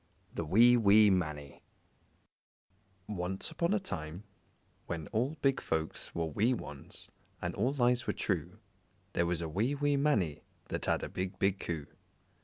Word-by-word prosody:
The - - -2
Wee, 120 +9 +6
Wee 105 -1 +6
Mannie 75 -6 -2 1.5
Once 95 -2 -3
upon 170 +1 0
a 210 - +3
time, 80 - -5 0.6
when 80 -2 -3
all 130 +8 0
big 135 -1 +3
folks 80 -1 -3
were 85 - 0
wee 105 - +2
ones 75 - -8 0.3
and - - -3
all 125 +7 +1
lies 125 -2 +2
were - - +1
true, 90 0 -2 0.6
there 85 - +1
was 85 -1 -1
a - - -2
wee, 110 - 0
wee 145 0 +2
Mannie 110 - +1 0.3
that - - -3
had - - +1
a - - -2
big, 95 0 -4
big 95 0 +1
Coo. 80 -4 -3
95 Hz, 155 wpm, -32 LUFS, 85-125 Hz, 1.5 s, Wee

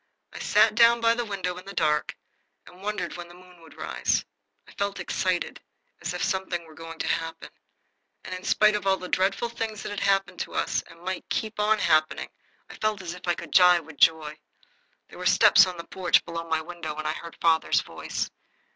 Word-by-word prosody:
I - - -8
sat 220 -1 +4
down 235 +1 +6
by 230 0 +4
the 240 0 -2
window 190 -4 -3
in 185 - -14
the 200 - -7
dark 150 -3 +1 0.5
and 180 +1 -16
wondered 200 -4 -3
when 175 0 -7
the 175 - -14
moon 180 -1 -17
would 160 -2 -16
rise. - - -1 0.4
I - - -14
felt 200 0 -3
excited 185 -2 -2 0.4
as - - -3
if - - -2
something 185 -3 -2
were 160 - -15
going 165 +1 -9
to - - -3
happen. 165 0 -3 0.7
And 185 - -7
in 185 0 -6
spite 215 +2 +4
of 205 -2 -3
all 190 0 +4
the 185 - -7
dreadful 190 +6 +1
things 225 -2 -5
that - - -5
had 205 - -4
happened 195 -2 +1
to - - -5
us, - - 0
and 165 0 -16
might 185 0 -5
keep 215 -1 -3
on 215 +1 +3
happening, 155 -5 +1 0.4
I - - -12
felt 215 -3 -1
as 170 -2 -5
if 180 0 -11
I 175 - +2
could - - -9
die 180 -1 +7
with 160 -2 -13
joy. 155 0 +3 0.7
There - - -13
were - - 0
steps - - +7
on 180 -1 -6
the 170 - -6
porch 180 +1 +1
below 165 0 -5
my 160 0 +1
window. 160 -2 -6
I 155 0 -2
heard 170 +1 -9
father's 165 -1 +3
voice. - - -5
180 Hz, 210 wpm, -26 LUFS, 165-200 Hz, 0.7 s, die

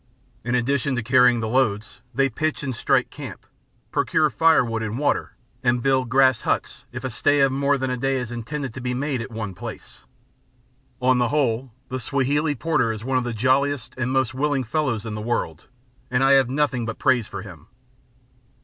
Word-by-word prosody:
In 120 +2 0
addition 135 +2 0
to 120 - -2
carrying 125 0 +4
the 110 - -2
loads, 110 -4 0
they 135 +2 +2
pitch 155 +5 -2
and 130 -3 -3
strike - - +1
camp, - - -9 0.5
procure - - +2
firewood 125 -9 +3
and 110 +1 -3
water, 145 +1 0 0.3
and 120 -1 +1
build 130 -2 +2
grass 130 -1 +4
huts - - -2
if - - -7
a - - -2
stay 145 0 +2
of 135 -1 +4
more 140 +1 +1
than 130 -1 -2
a 125 - -1
day 135 +2 0
is 125 -3 -3
intended 130 +2 -5
to 130 - -7
be 125 0 -2
made 135 -1 -2
at 115 - -6
one 110 -4 -5
place. 90 - -9 0.9
On 130 0 +3
the 120 - +2
whole, 130 -3 0 0.2
the 130 0 -3
Swahili 145 +4 0
porter 140 -4 +1
is 110 -1 -6
one 130 0 +1
of - - -3
the 120 - -3
jolliest 130 +3 +1
and 130 0 -2
most 130 -1 +1
willing 140 0 0
fellows 125 -4 -1
in 110 - -4
the 105 - -4
world, 100 -8 -3 0.4
and 125 +1 +1
I 135 - +5
have 135 -2 +5
nothing 135 -3 0
but 115 - -4
praise 125 -4 +2
for 100 0 -7
him. 90 -7 -12
130 Hz, 195 wpm, -23 LUFS, 115-135 Hz, 0.9 s, I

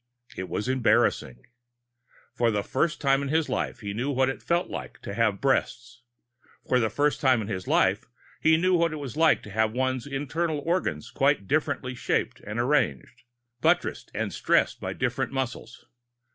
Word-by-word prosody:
It 95 0 -5
was 105 - -3
embarrassing. 110 - +1 0.9
For 120 -1 +2
the 105 -2 0
first 155 +7 0
time 135 -1 +2
in 140 - -3
his 160 +2 +1
life, - - -2
he 100 -2 -4
knew 120 +7 -2
what 130 -1 +2
it 135 - -5
felt 170 +1 0
like - - -7
to - - -5
have - - +1
breasts. 120 +1 -1 0.7
For 125 - +3
the 110 -2 +1
first 145 +7 0
time 130 -3 +4
in 105 - -4
his 95 -3 -4
life, - - +2 0.4
he 160 0 +5
knew 185 +3 +2
what 170 -2 +2
it - - -4
was 140 -2 -6
like 160 0 +3
to 105 - -10
have 110 +1 +1
one's 130 0 -1
internal 150 +4 -2
organs 165 - -1
quite 100 - +1
differently 135 -3 0
shaped 120 - -1
and 105 +3 -6
arranged, 120 - 0 0.4
buttressed - - +1
and - - -2
stressed - - +1
by - - -3
different - - -2
muscles. 125 -2 -5
130 Hz, 175 wpm, -26 LUFS, 110-150 Hz, 0.9 s, he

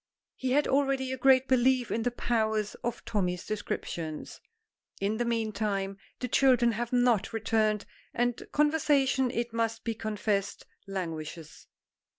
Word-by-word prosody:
He 260 -1 -1
had 290 +1 +3
already 270 -1 +1
a 260 - -2
great 265 0 +5
belief 255 -1 +3
in 230 - 0
the 245 - +1
powers 220 -3 0
of 240 -1 -3
Tommy's 180 -4 -1
descriptions. 170 -6 -4 0.6
In 205 +3 0
the 240 - 0
meantime 210 -4 -1 0.2
the 250 - -1
children 245 -2 +4
have 235 +2 -3
not 245 -4 +2
returned, 215 -1 +1 0.3
and 245 0 0
conversation, 290 -3 +2
it 235 -1 -3
must 230 0 -1
be 230 - -1
confessed, 210 -2 -2 0.2
languishes. 165 -4 -6
230 Hz, 135 wpm, -29 LUFS, 205-255 Hz, 0.6 s, great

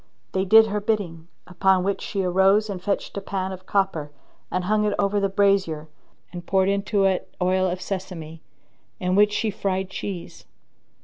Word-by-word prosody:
They 190 0 0
did 220 +3 +7
her 210 -1 -2
bidding, 185 -7 -2 0.2
upon 185 +1 +2
which 200 +1 -1
she 195 -2 -2
arose 195 +4 +3
and 185 -2 -6
fetched 200 +1 -2
a - - -2
pan 190 -1 -3
of 185 0 -9
copper 190 -7 0 0.4
and 185 - -1
hung 210 +3 +1
it 210 -1 +1
over 205 0 +1
the 200 0 +1
brazier 190 -6 +1 0.4
and 175 -1 -6
poured 190 +1 +2
into 200 +1 +1
it 190 -1 0
oil 185 +1 +2
of 180 +1 -4
sesame, 170 -5 -6 0.6
in 180 0 0
which 205 +2 +5
she 215 +1 0
fried 190 -1 -2
cheese. 190 -3 -6
190 Hz, 175 wpm, -24 LUFS, 180-200 Hz, 0.6 s, did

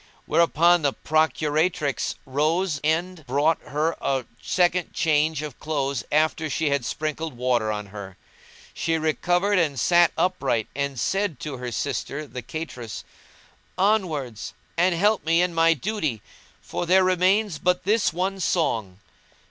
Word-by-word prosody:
Thereupon 170 +2 +4
the 140 -2 +1
procuratrix 155 -1 0
rose 155 +4 0
end 165 +2 -1
brought 145 +5 +2
her 155 +3 -1
a 135 -3 0 0.2
second 180 0 +1
change 155 -1 +1
of 150 -4 -7
clothes 140 -4 -2
after 155 +1 +1
she 150 0 0
had 140 -2 +1
sprinkled 155 0 -3
water 120 -3 +1
on 105 -1 -4
her. 100 -3 -8 0.6
She 165 0 0
recovered 175 +5 +1
and 145 -6 0
sat 175 +4 +4
upright 140 - 0
and 140 -2 -2
said 195 -2 -1
to 145 -3 -5
her 125 -1 -5
sister 145 +4 -3
the 125 -2 -7
cateress, 125 -3 -6 0.7
"Onwards, 170 - 0 0.2
and 175 +1 +3
help 205 +4 +2
me 165 +1 +2
in 180 -1 +1
my 165 0 +4
duty, 155 - -3 0.4
for 175 - -4
there 185 +2 +5
remains 185 0 +2
but 180 +3 +1
this 210 +2 +2
one 190 +4 -2
song." 115 - 0
155 Hz, 140 wpm, -24 LUFS, 140-175 Hz, 0.7 s, there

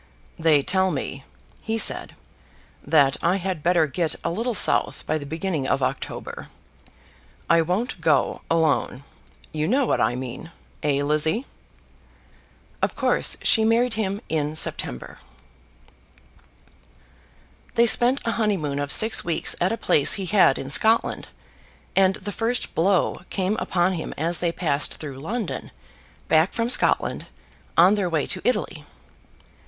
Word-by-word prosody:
"They 155 -3 +3
tell 190 +3 +1
me," 135 -3 -5 0.4
he 225 +1 -3
said, - - +4 0.7
"that 140 -4 +3
I 175 +2 +2
had 185 -4 -3
better 170 0 +2
get 155 +3 -2
a - - -1
little 230 +6 -2
south - - +2
by 155 - -1
the 145 - -9
beginning 160 -2 -3
of 135 - 0
October. - - -5 1.0
I 170 0 +4
won't 180 +4 -2
go 155 -4 +1
alone. 155 -5 0 0.5
You 155 0 -2
know 265 +5 +2
what - - 0
I - - +1
mean; 130 +6 -7 0.3
eh, 145 -2 0
Lizzie?" 155 - +1 1.4
Of - - -1
course - - +1
she 220 - +4
married 230 +2 +2
him 205 -2 -3
in 155 -1 -2
September. 65 - -2 2.6
They 235 0 +5
spent 245 +3 +4
a 230 - 0
honeymoon 160 -10 -1
of 145 -1 -3
six 220 +1 +3
weeks 170 -2 0
at 180 - +2
a 230 - -2
place 145 -9 +3
he 195 - -3
had 185 -7 +3
in 135 - -6
Scotland, 220 +8 +2 0.7
and 190 0 +3
the 205 - -7
first 230 +4 -1
blow 185 +3 +1
came 190 +2 -1
upon 180 -2 0
him 165 - -5
as 165 +3 0
they 170 -1 0
passed 150 -4 -1
through 140 -4 -8
London, 210 - -5 0.6
back 160 +3 +2
from 230 0 -1
Scotland, 250 - 0 0.5
on 180 +4 +6
their 200 -4 -1
way 160 -4 -1
to - - -2
Italy. 210 -10 -2
175 Hz, 140 wpm, -23 LUFS, 150-210 Hz, 2.6 s, on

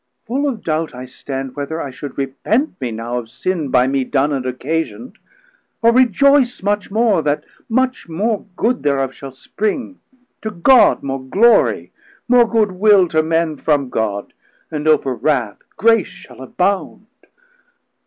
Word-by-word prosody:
full 275 +5 -1
of 230 -6 -6
doubt 160 -2 -2
I 125 +1 -7
stand, 135 0 -7
Whether 145 +3 -4
I 140 - -5
should 135 +1 -9
repent 140 - -1
me 125 - -2
now 115 +2 -4
of 115 -2 -10
sin 160 +2 -3
By 125 0 +3
mee 135 0 0
done 140 +2 0
and 130 -2 -2
occasiond, 160 - -4 0.6
or 230 - +6
rejoyce 255 0 +3
Much 205 0 -1
more, 215 -3 +2
that 145 -1 -1 0.3
much 255 -4 -1
more 210 +6 -2
good 240 +6 0
thereof 135 -2 0
shall 135 0 -9
spring, 215 - -4 0.4
To 220 - -3
God 215 +7 +4
more 135 -1 -3
glory, 205 - +3 0.4
more 240 -2 +5
good 220 -3 +2
will 195 0 +4
to 155 -1 +2
Men 160 -1 0
From 145 -3 0
God, 100 -2 -3 0.4
and 150 0 -3
over 145 -4 +3
wrauth 120 -4 -1 0.2
grace 225 -3 +3
shall 125 0 -14
abound. 190 - -2
160 Hz, 155 wpm, -18 LUFS, 135-220 Hz, 0.6 s, or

